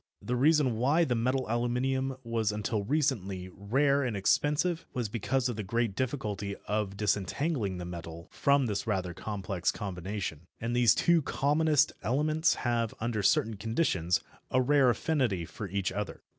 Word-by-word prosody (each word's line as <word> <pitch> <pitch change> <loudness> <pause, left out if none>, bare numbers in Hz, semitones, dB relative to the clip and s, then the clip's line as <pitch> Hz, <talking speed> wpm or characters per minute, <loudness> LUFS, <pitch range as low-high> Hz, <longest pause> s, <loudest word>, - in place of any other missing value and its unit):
The 125 - -2
reason 140 -3 +3
why 140 +8 +3
the 130 - 0
metal 130 +3 0
aluminium 125 +3 0
was 115 -2 0
until 105 0 -2
recently 100 -9 -1
rare 140 +8 +2
and 120 -5 -2
expensive 150 - +1
was 120 -4 -1
because 120 +4 0
of 120 -3 -3
the - - -2
great 115 +1 -1
difficulty 105 -7 -2
of 105 -1 -1
disentangling 105 - -1
the 90 - -5
metal 85 0 -8
from 140 -1 +3
this 105 -1 -2
rather 95 -4 -1
complex 95 -2 -2
combination. 90 -4 -5
And 115 +1 -2
these 120 -2 +5
two 170 -1 +4
commonest 150 +1 +2
elements 155 +6 +2
have, 115 -2 0
under 110 -2 -1
certain 110 +2 +2
conditions, 95 - 0 0.3
a 130 - +2
rare 135 0 +4
affinity 120 - 0
for 100 +4 -7
each 100 0 -1
other. 105 -3 -5
115 Hz, 155 wpm, -30 LUFS, 100-135 Hz, 0.3 s, these